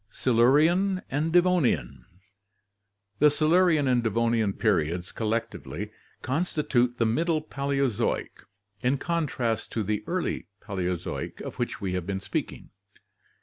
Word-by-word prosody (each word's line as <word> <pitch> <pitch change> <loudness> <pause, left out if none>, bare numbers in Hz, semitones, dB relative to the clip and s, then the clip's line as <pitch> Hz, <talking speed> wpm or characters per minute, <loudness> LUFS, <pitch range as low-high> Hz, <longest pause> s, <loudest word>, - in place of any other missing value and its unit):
Silurian 155 - +3
and 150 +4 0
Devonian. 175 - +2 0.6
— 100 0 -50
The 150 - +7
Silurian 155 0 +3
and 125 -2 +3
Devonian 115 -1 +1
periods 90 -5 0
collectively 105 - -3 0.3
constitute 130 -4 0
the 115 - +2
Middle 160 +8 +1
Paleozoic, 140 -5 -1 0.4
in 130 +3 +2
contrast 130 -9 -1
to 110 - 0
the 105 +1 -2
Early 180 0 -2
Paleozoic 90 -4 -4
of - - -7
which - - -2
we 95 -2 -2
have 90 -1 -3
been 95 -1 -2
speaking. - - -5
120 Hz, 115 wpm, -27 LUFS, 100-155 Hz, 0.6 s, The